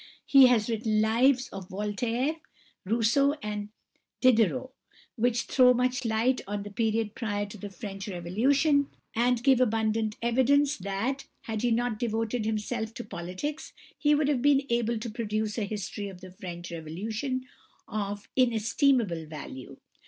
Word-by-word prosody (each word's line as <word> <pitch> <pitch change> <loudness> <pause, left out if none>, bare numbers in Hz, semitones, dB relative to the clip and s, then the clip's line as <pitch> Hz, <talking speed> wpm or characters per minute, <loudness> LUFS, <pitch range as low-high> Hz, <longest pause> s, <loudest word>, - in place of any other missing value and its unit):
He 270 -2 +8
has 230 -4 +3
written 220 -2 0
lives 245 +4 +3
of 195 -2 -8
Voltaire, 230 - -1 0.5
Rousseau, 235 +7 +3
and 210 -1 -4 0.5
Diderot, 255 +1 +3 0.4
which 235 0 +1
throw 250 -1 +5
much 250 +1 0
light 230 +3 +1
on 205 0 -3
the 205 - -8
period 220 0 0
prior 205 -3 -2
to 205 - -10
the 205 - -6
French 195 0 -7
Revolution, 265 - +2 0.3
and 240 +1 +2
give 265 -2 +5
abundant 220 -2 +1
evidence 270 +5 +3
that, 200 +8 -3
had 220 -2 -4
he 245 - +2
not 235 -1 0
devoted 225 0 -1
himself 220 +1 -2
to 240 - -5
politics 185 - -5 0.2
he 295 0 +3
would 295 -1 +1
have 280 -4 +1
been 285 0 +4
able 235 0 +1
to 225 +2 -5
produce 215 -1 -2
a 210 - 0
history 205 0 -5
of 185 -2 -11
the 185 0 -10
French 175 -1 -8
Revolution 215 - -4 0.4
of 205 -1 -4
inestimable 230 - +2
value. 145 -4 -9
225 Hz, 145 wpm, -28 LUFS, 205-255 Hz, 0.5 s, He